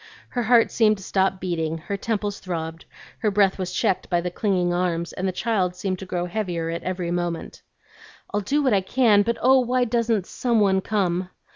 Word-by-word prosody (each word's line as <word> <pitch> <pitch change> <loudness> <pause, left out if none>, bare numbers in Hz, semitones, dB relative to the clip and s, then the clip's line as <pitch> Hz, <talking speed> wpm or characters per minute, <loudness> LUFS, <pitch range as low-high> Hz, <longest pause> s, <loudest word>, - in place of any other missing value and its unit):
Her 245 - -2
heart 235 0 +4
seemed 215 -2 +3
to 195 - -11
stop 190 0 +1
beating, 165 -3 -2
her 170 +5 -5
temples 205 0 -2
throbbed, 165 -3 -5 0.3
her 215 - +1
breath 200 -1 +2
was 185 -1 -3
checked 185 - 0
by 175 - +2
the 180 +1 -3
clinging 180 -3 0
arms, 175 -1 -1
and 190 - -2
the - - 0
child, 185 -2 0
seemed 185 0 -3
to 190 - -8
grow 175 -1 -2
heavier 175 -4 -2
every 175 +1 -3
moment. 175 -1 -3 0.7
"I'll 205 - +1
do 290 +9 0
what 260 -5 +3
I 195 - +3
can, 215 0 +4
but, 230 +3 0
oh, 260 +1 +6
why 250 0 +1
don't 230 -4 0
some 235 +1 0
one 190 -2 +3
come?" 185 -3 -1
190 Hz, 195 wpm, -24 LUFS, 175-220 Hz, 0.7 s, oh